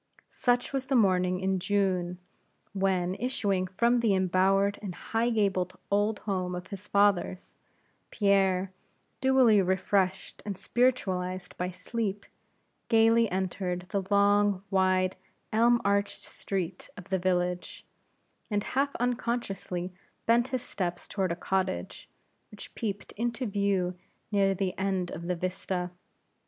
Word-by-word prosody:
Such 245 Hz, +2 st, +1 dB
was 265 Hz, -1 st, -2 dB
the 270 Hz, -, +1 dB
morning 185 Hz, -5 st, +3 dB
in 190 Hz, 0 st, +1 dB
June, 185 Hz, -2 st, 0 dB, 0.6 s
when, 190 Hz, -2 st, +1 dB
issuing 200 Hz, -5 st, -1 dB
from 235 Hz, +6 st, +2 dB
the 225 Hz, -4 st, +3 dB
embowered 190 Hz, +2 st, +2 dB
and 190 Hz, -4 st, -5 dB
high 230 Hz, +1 st, -1 dB
gabled 190 Hz, -5 st, 0 dB
old 205 Hz, +1 st, +2 dB
home 185 Hz, -3 st, -2 dB
of 180 Hz, 0 st, -6 dB
his 200 Hz, 0 st, -8 dB
fathers, 200 Hz, -2 st, +1 dB, 0.5 s
Pierre, 195 Hz, -2 st, +2 dB, 0.5 s
dewily 260 Hz, -6 st, +5 dB
refreshed 190 Hz, +1 st, 0 dB
and 200 Hz, -3 st, -4 dB
spiritualized 185 Hz, -8 st, 0 dB
by 180 Hz, 0 st, -2 dB
sleep, 200 Hz, +2 st, -3 dB, 0.6 s
gayly 225 Hz, 0 st, +4 dB
entered 185 Hz, -1 st, -2 dB
the 200 Hz, -2 st, 0 dB
long, 200 Hz, -1 st, +3 dB
wide, 185 Hz, -1 st, +2 dB, 0.4 s
elm 235 Hz, +2 st, +5 dB
arched 200 Hz, 0 st, +1 dB
street 190 Hz, -2 st, -4 dB
of 185 Hz, -1 st, -11 dB
the 190 Hz, -1 st, +1 dB
village, 180 Hz, -1 st, -1 dB, 0.6 s
and 205 Hz, -2 st, 0 dB
half 275 Hz, +4 st, 0 dB
unconsciously 230 Hz, -7 st, -2 dB, 0.3 s
bent 235 Hz, +2 st, +4 dB
his 255 Hz, -2 st, -3 dB
steps 175 Hz, -6 st, -3 dB
toward 190 Hz, -3 st, -1 dB
a -, -, -1 dB
cottage, 185 Hz, -, -2 dB, 0.4 s
which 210 Hz, -, -11 dB
peeped 205 Hz, -3 st, -4 dB
into 235 Hz, +2 st, -1 dB
view 200 Hz, -3 st, 0 dB, 0.4 s
near 195 Hz, -1 st, +3 dB
the 190 Hz, -1 st, -1 dB
end 190 Hz, -2 st, -1 dB
of 170 Hz, +1 st, -6 dB
the 180 Hz, -, 0 dB
vista. 180 Hz, 0 st, -3 dB
195 Hz, 125 wpm, -29 LUFS, 185-215 Hz, 0.6 s, dewily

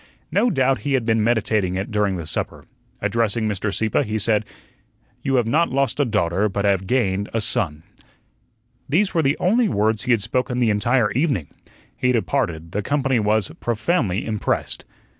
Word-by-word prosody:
No 245 Hz, -, +3 dB
doubt 135 Hz, -, +2 dB
he 145 Hz, -, -2 dB
had 130 Hz, -4 st, +1 dB
been 110 Hz, -2 st, +2 dB
meditating 110 Hz, -5 st, +1 dB
it 95 Hz, +2 st, -3 dB
during 105 Hz, -2 st, +1 dB
the 85 Hz, -, -5 dB
supper. 80 Hz, -, -4 dB, 0.4 s
Addressing 115 Hz, -1 st, 0 dB
Mr. 105 Hz, 0 st, -1 dB
Sieppe, 110 Hz, +1 st, +1 dB
he 110 Hz, +1 st, -2 dB
said: 110 Hz, 0 st, +1 dB, 0.8 s
"You 135 Hz, -, 0 dB
have 120 Hz, -3 st, +3 dB
not 155 Hz, +9 st, +2 dB
lost 135 Hz, +2 st, 0 dB
a 145 Hz, -, +3 dB
daughter, 105 Hz, -2 st, +1 dB
but 100 Hz, +1 st, -2 dB
have 95 Hz, -2 st, +1 dB
gained 100 Hz, -5 st, 0 dB
a -, -, +2 dB
son." 105 Hz, -10 st, -1 dB, 1.1 s
These 190 Hz, +8 st, +2 dB
were 165 Hz, -, +3 dB
the 140 Hz, 0 st, +1 dB
only 220 Hz, +4 st, +3 dB
words 110 Hz, -, 0 dB
he 125 Hz, -, +1 dB
had 115 Hz, -4 st, +3 dB
spoken 125 Hz, +2 st, -1 dB
the 120 Hz, -3 st, +3 dB
entire 105 Hz, +1 st, +2 dB
evening. 130 Hz, -, 0 dB, 0.5 s
He 125 Hz, -, +1 dB
departed; 85 Hz, -6 st, -1 dB
the 105 Hz, -, -1 dB
company 135 Hz, 0 st, +1 dB
was 105 Hz, -2 st, +1 dB
profoundly 115 Hz, -, 0 dB
impressed. 105 Hz, -2 st, -2 dB
110 Hz, 175 wpm, -22 LUFS, 100-130 Hz, 1.1 s, No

